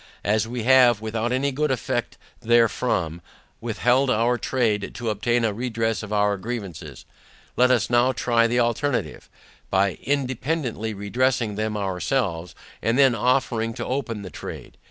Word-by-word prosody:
As 110 +2 +1
we 120 0 -4
have, 125 -3 +5
without 110 +2 -2
any 135 +3 0
good 150 +3 0
effect 130 -5 -2 0.2
therefrom, 110 -7 +1 0.4
withheld 125 +4 +1
our 120 +1 +2
trade 110 -4 -1
to 120 -2 -2
obtain 120 +3 0
a 110 - 0
redress 115 -1 -2
of 105 -1 -8
our 105 -1 +2
grievances, 95 - -7 0.5
let 125 +1 +4
us 120 -3 +2
NOW 120 +2 +3
try 115 -2 +2
the 120 +1 +1
alternative, 120 - -1 0.4
by 95 -3 +1
INDEPENDANTLY 130 -4 -2
redressing 120 +2 0
them 110 +1 -2
ourselves, 95 -2 -2 0.3
and 115 +2 +1
then 135 -3 +5
offering 115 -1 0
to - - -4
open 125 -5 -3
the 95 - -8
trade. - - -9
115 Hz, 145 wpm, -23 LUFS, 105-125 Hz, 0.5 s, have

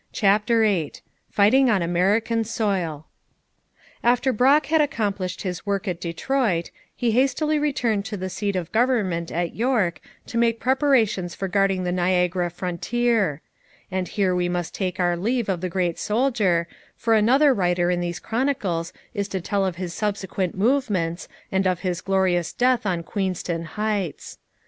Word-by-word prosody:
CHAPTER 215 +3 +3
VIII 195 -9 +1 0.4
FIGHTING 245 +6 +4
ON 200 -6 +2
AMERICAN 205 +7 +1
SOIL 195 -9 -2 1.0
After 245 +2 +3
Brock 275 +6 +4
had 315 +2 +3
accomplished 205 -10 -2
his 180 -3 -4
work 200 0 -2
at 180 -2 -3
Detroit, 175 +1 -1 0.2
he 240 -2 0
hastily 285 +5 +2
returned 245 -8 0
to 205 - -4
the 185 0 -4
seat 200 +1 -3
of 180 -2 -3
government 215 -9 +1
at 170 0 -2
York 225 -8 0 0.2
to 230 - -3
make 230 -1 +2
preparations 250 - +1
for 195 - -3
guarding 195 -1 +1
the 180 - -1
Niagara 180 0 +1
frontier; 185 0 -1 0.5
and 185 -1 -1
here 190 +1 0
we 180 0 0
must 175 -2 -3
take 185 -1 -3
our 175 -1 +2
leave 230 +6 -1
of 185 -3 -1
the 185 - -2
great 175 -1 -1
soldier, 210 -7 +1 0.3
for 230 - +1
another 260 +7 +5
writer 180 -3 +1
in 175 - 0
these 175 -1 -3
Chronicles 215 -10 -1 0.2
is 200 -3 -2
to 190 -1 -3
tell 195 +3 -1
of 185 -3 -1
his 175 -1 -5
subsequent 195 -3 -2
movements, 200 -7 0 0.2
and 190 0 +1
of 180 -2 0
his 180 -2 -2
glorious 185 -3 +1
death 250 -3 +2
on 175 -3 -1
Queenston 180 -3 -3
Heights. 205 -1 -3
195 Hz, 155 wpm, -23 LUFS, 175-230 Hz, 1.0 s, another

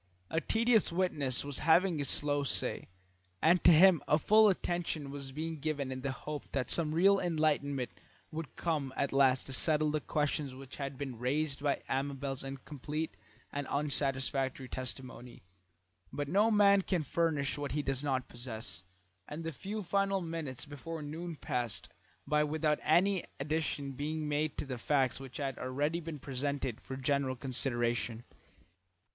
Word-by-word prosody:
A 160 - +1
tedious 225 -1 +3
witness 150 -8 +1
was 145 -2 -3
having 165 +1 +4
his 140 -2 -2
slow 145 -1 +2
say, 140 - -1 0.5
and 170 +3 +4
to - - +9
him 175 +1 +7
a 150 - +5
full 215 +6 +6
attention 175 -6 -2
was 140 -1 -6
being 160 +2 -4
given 140 -3 -2
in 130 0 -4
the 135 0 -1
hope 150 +3 -6
that 130 -3 -1
some 155 -2 +2
real 195 +4 +5
enlightenment 150 -6 0 0.4
would 155 -2 -6
come 150 -6 -1
at 140 - 0
last 135 -1 +4
to 135 - -4
settle 155 +2 +4
the 155 - +1
questions 145 -3 -1
which 135 0 -10
had 140 -1 -4
been 130 -4 -5
raised 140 +3 0
by 145 -1 0
Amabel's 135 0 -2
incomplete 145 +3 -5 0.4
and 145 -1 -3
unsatisfactory 135 -2 0
testimony. 125 -2 -5 0.7
But 145 -1 -3
no 205 +8 +4
man 200 -2 +6
can 180 -3 0
furnish 150 -2 0
what 145 -1 -3
he 150 0 0
does 135 0 0
not 130 -3 0
possess, 115 -7 -7 0.4
and 150 +3 -6
the 165 - -3
few 200 +8 -5
final 195 +2 +1
minutes 165 -7 -4
before 150 +2 -6
noon 165 +3 -5
passed 120 - -3 0.4
by 150 +1 +3
without 150 0 +1
any 180 +4 +3 0.2
addition 145 -1 -1
being 150 +3 -3
made 150 +1 0
to - - -2
the 130 -3 -5
facts 135 -1 +1
which 135 -2 -8
had 135 -3 -3
already 145 +6 -1
been 165 -2 -6
presented 135 -2 -3
for 130 - -6
general 135 -1 0
consideration. 120 -3 -1
145 Hz, 160 wpm, -33 LUFS, 135-160 Hz, 0.7 s, to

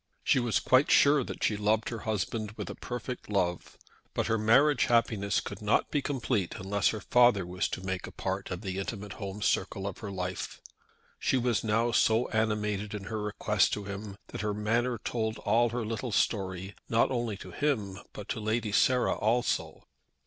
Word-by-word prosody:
She - - +4
was 120 -3 +1
quite 130 +3 +4
sure 145 -1 +5
that - - -6
she 105 - +2
loved 105 +1 +1
her 115 - -5
husband 105 +1 -2
with - - -6
a - - -5
perfect 125 -1 -6
love. 90 -4 -1 0.4
But - - +1
her 110 0 +1
marriage 130 +6 +4
happiness 110 -4 +2
could - - -7
not - - +1
be 145 - +1
complete 125 -9 -1
unless 100 +1 0
her 110 - 0
father 120 -4 +4
was 90 +1 -1
to 95 - -5
make 95 -1 -3
a - - -9
part 95 0 -3
of 90 0 -4
the 95 -2 -3
intimate 100 0 -5
home 100 +1 -5
circle 95 - 0
of 100 -2 -5
her 105 - -6
life. 90 -1 -4 0.6
She 130 - +2
was 120 -2 +1
now 115 +2 +2
so 115 +1 +3
animated 105 -2 -1
in 100 - -5
her 110 - -2
request 105 -1 +1
to 105 - -2
him, 100 0 -6
that - - -5
her 105 -1 -1
manner 115 +4 0
told 110 0 -2
all 120 +1 +2
her 120 0 -3
little 115 +2 -3
story, 95 -2 0 0.2
not 115 +3 +3
only 120 -5 -1
to - - -10
him, 105 -10 -1
but - - -9
to - - -2
Lady 110 0 -1
Sarah 125 +4 +3
also. 115 +3 0
110 Hz, 190 wpm, -29 LUFS, 100-120 Hz, 0.6 s, sure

